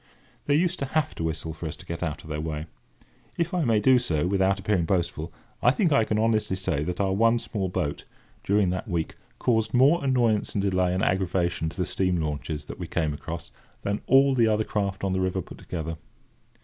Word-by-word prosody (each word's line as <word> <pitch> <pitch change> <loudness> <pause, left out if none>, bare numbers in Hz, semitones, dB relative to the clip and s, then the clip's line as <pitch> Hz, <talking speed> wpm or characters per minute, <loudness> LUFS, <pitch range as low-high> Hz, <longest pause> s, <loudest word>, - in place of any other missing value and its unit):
They 145 - +3
used 175 +3 +1
to 140 - -2
have 155 - +1
to - - -5
whistle 80 0 -3
for 80 +1 -6
us 75 - -5
to - - -14
get 85 - -5
out 80 -5 -3
of 80 - -12
their 75 0 -2
way. 80 -1 -4 0.7
If 170 +1 -1
I 180 -2 +1
may 115 -3 +3
do 125 +4 +5
so, 85 -10 0
without 95 +1 +2
appearing 95 -3 +1
boastful, 85 -2 -1 0.3
I - - +5
think 165 - +2
I 140 -6 +4
can 105 - 0
honestly 110 -3 +1
say 85 -6 -1
that 90 +1 -3
our 95 -1 +1
one 115 +4 +4
small 100 -4 -3
boat, 90 -5 -2 0.4
during 100 -2 +2
that 90 - -3
week, 85 -2 -2 0.2
caused 110 -2 +1
more 140 +6 +5
annoyance 120 -6 +1
and 100 - +2
delay 90 -2 +1
and 95 - 0
aggravation 90 -3 0
to 85 - -13
the 90 - 0
steam 90 -2 0
launches 75 -1 -3
that - - -9
we - - -4
came 80 -4 0
across 85 +3 -7 0.3
than 100 +1 -1
all 135 +1 +6
the 120 -3 +4
other 110 0 +2
craft 100 -3 -2
on 95 -1 0
the 95 - 0
river 95 0 0
put 90 - -9
together. 80 -2 -5
95 Hz, 220 wpm, -26 LUFS, 85-115 Hz, 0.7 s, all